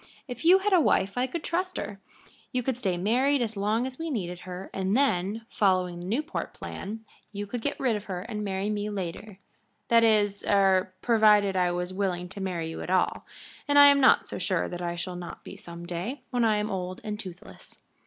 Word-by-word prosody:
If 250 Hz, +3 st, -7 dB
you 355 Hz, +3 st, +7 dB
had 395 Hz, +1 st, 0 dB
a 360 Hz, -, +6 dB
wife 195 Hz, -8 st, +2 dB
I 250 Hz, +1 st, +1 dB
could 320 Hz, +4 st, -5 dB
trust 365 Hz, +2 st, -1 dB
her. 200 Hz, -1 st, -5 dB, 0.5 s
You 250 Hz, -1 st, -1 dB
could 265 Hz, 0 st, -1 dB
stay 195 Hz, -7 st, -1 dB
married 255 Hz, +9 st, +2 dB
as 225 Hz, -2 st, -2 dB
long 210 Hz, +4 st, 0 dB
as 260 Hz, -1 st, -7 dB
we 330 Hz, 0 st, -3 dB
needed 180 Hz, -, -3 dB
her, 185 Hz, +1 st, -8 dB
and 195 Hz, +3 st, 0 dB
then, 220 Hz, -4 st, 0 dB
following 185 Hz, -6 st, +1 dB
the 175 Hz, -, -7 dB
Newport 295 Hz, -, -3 dB
plan, 220 Hz, +3 st, -7 dB, 0.3 s
you 205 Hz, 0 st, -4 dB
could 235 Hz, +3 st, -5 dB
get 285 Hz, +4 st, -2 dB
rid 250 Hz, -5 st, +1 dB
of 210 Hz, 0 st, -5 dB
her 180 Hz, -2 st, -4 dB
and 210 Hz, 0 st, -5 dB
marry 195 Hz, +1 st, -2 dB
me 210 Hz, 0 st, -2 dB
later 195 Hz, +1 st, -5 dB, 0.5 s
that 230 Hz, 0 st, +6 dB
is 205 Hz, -3 st, +3 dB
er 190 Hz, -2 st, +3 dB
provided 210 Hz, -4 st, +4 dB
I 180 Hz, -1 st, +2 dB
was 180 Hz, +1 st, -3 dB
willing 180 Hz, -2 st, -2 dB
to 195 Hz, +2 st, -7 dB
marry 175 Hz, -4 st, -2 dB
you -, -, -6 dB
at -, -, -6 dB
all, 185 Hz, 0 st, +1 dB, 0.4 s
and 290 Hz, 0 st, +3 dB
I 285 Hz, 0 st, +10 dB
am 280 Hz, 0 st, +5 dB
not 260 Hz, -, +5 dB
so -, -, -5 dB
sure -, -, 0 dB
that 175 Hz, 0 st, -6 dB
I 170 Hz, 0 st, -2 dB
shall 180 Hz, +1 st, -4 dB
not 175 Hz, -1 st, -8 dB
be -, -, -9 dB
some 170 Hz, 0 st, -10 dB
day, 190 Hz, +10 st, -4 dB
when 245 Hz, -1 st, +1 dB
I 220 Hz, -2 st, +3 dB
am 210 Hz, 0 st, -2 dB
old 185 Hz, -1 st, -4 dB
and 210 Hz, -1 st, -4 dB
toothless." 185 Hz, 0 st, -10 dB
205 Hz, 220 wpm, -27 LUFS, 185-245 Hz, 0.5 s, I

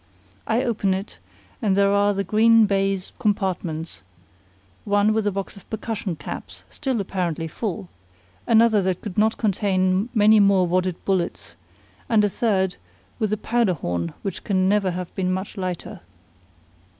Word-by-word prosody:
I 230 Hz, +3 st, +1 dB
open 205 Hz, -6 st, 0 dB
it, 195 Hz, +2 st, -7 dB, 0.4 s
and 200 Hz, -4 st, +1 dB
there 200 Hz, 0 st, +4 dB
are 205 Hz, 0 st, +3 dB
the 200 Hz, -, 0 dB
green 225 Hz, +3 st, +5 dB
baize 195 Hz, -1 st, -1 dB
compartments, 185 Hz, -7 st, -2 dB, 0.8 s
one 205 Hz, +1 st, +2 dB
with 215 Hz, -1 st, 0 dB
a -, -, +2 dB
box 195 Hz, 0 st, -5 dB
of 200 Hz, -, -16 dB
percussion 220 Hz, -4 st, -3 dB
caps, 145 Hz, -, -8 dB
still 265 Hz, -5 st, -2 dB
apparently 175 Hz, -4 st, -2 dB
full, 170 Hz, -, -4 dB, 0.6 s
another 225 Hz, -2 st, +5 dB
that 185 Hz, -1 st, -1 dB
could 205 Hz, -5 st, -6 dB
not 220 Hz, +1 st, +2 dB
contain 190 Hz, -1 st, +1 dB
many 215 Hz, 0 st, +6 dB
more 200 Hz, -2 st, +4 dB
wadded 180 Hz, 0 st, 0 dB
bullets, 170 Hz, -, -2 dB, 0.6 s
and 215 Hz, -2 st, +4 dB
a -, -, +1 dB
third 190 Hz, -4 st, 0 dB, 0.4 s
with 215 Hz, -2 st, 0 dB
a 215 Hz, -, +1 dB
powder 225 Hz, -3 st, +1 dB
horn 85 Hz, -, -3 dB
which 195 Hz, -3 st, -4 dB
can 185 Hz, -2 st, +1 dB
never 200 Hz, -1 st, +2 dB
have 180 Hz, 0 st, -5 dB
been 185 Hz, -1 st, -1 dB
much 190 Hz, +3 st, -4 dB
lighter. 185 Hz, -3 st, -5 dB
195 Hz, 150 wpm, -23 LUFS, 185-215 Hz, 0.8 s, many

